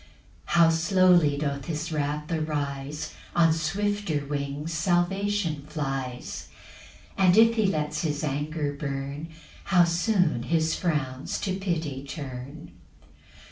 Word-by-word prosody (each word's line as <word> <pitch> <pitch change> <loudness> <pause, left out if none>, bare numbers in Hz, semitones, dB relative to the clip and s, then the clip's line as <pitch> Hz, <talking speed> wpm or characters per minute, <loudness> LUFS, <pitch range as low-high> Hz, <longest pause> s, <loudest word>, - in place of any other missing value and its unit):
4 170 - +5
How 165 - +6
slowly 170 -3 +4
doth 140 -2 -2
his 160 +2 -3
wrath 150 0 -1
arise! 150 -2 -3 0.2
On 165 -2 +5
swifter 175 -1 -1
wings 145 +2 -3
salvation 175 0 +1
flies; 135 -5 -4 0.7
And 185 0 +5
if 230 +1 +7
he 220 -3 +2
lets 150 -4 -1
his 150 -3 -2
anger 145 +1 -2
burn, 140 +1 -4 0.4
How 180 -2 +5
soon 170 - +2
his 160 -1 +2
frowns 145 -6 -2
to 190 -2 -1
pity 165 -8 -2
turn! 140 0 -7
155 Hz, 115 wpm, -27 LUFS, 145-175 Hz, 0.7 s, if